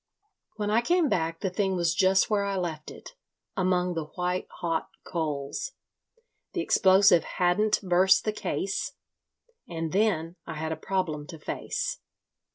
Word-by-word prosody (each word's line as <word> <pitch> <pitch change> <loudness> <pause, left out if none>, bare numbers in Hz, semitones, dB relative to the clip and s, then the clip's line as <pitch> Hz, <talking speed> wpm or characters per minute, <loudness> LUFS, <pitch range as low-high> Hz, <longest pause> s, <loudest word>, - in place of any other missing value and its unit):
"When 210 -1 -2
I 225 +2 +4
came 340 +3 +2
back 165 -4 -1
the 190 - -1
thing 190 0 0
was 170 -3 +1
just 190 +2 +4
where 210 -2 +1
I 200 -1 -1
left 160 -4 -3
it, - - -11 0.4
among 180 -2 +1
the 165 -2 -3
white 180 +3 -2
hot 165 -2 -2
coals. 155 - -3 0.8
The 350 - -1
explosive 190 - +5
hadn't 185 +4 +1
burst 185 +1 +4
the 215 - 0
case. 195 -2 -2 0.8
And 165 -2 -3
then 185 -4 +1
I 165 - -5
had 160 +1 -3
a - - -1
problem 160 -7 -2
to 165 - -9
face. 150 - -3
180 Hz, 150 wpm, -27 LUFS, 165-200 Hz, 0.8 s, explosive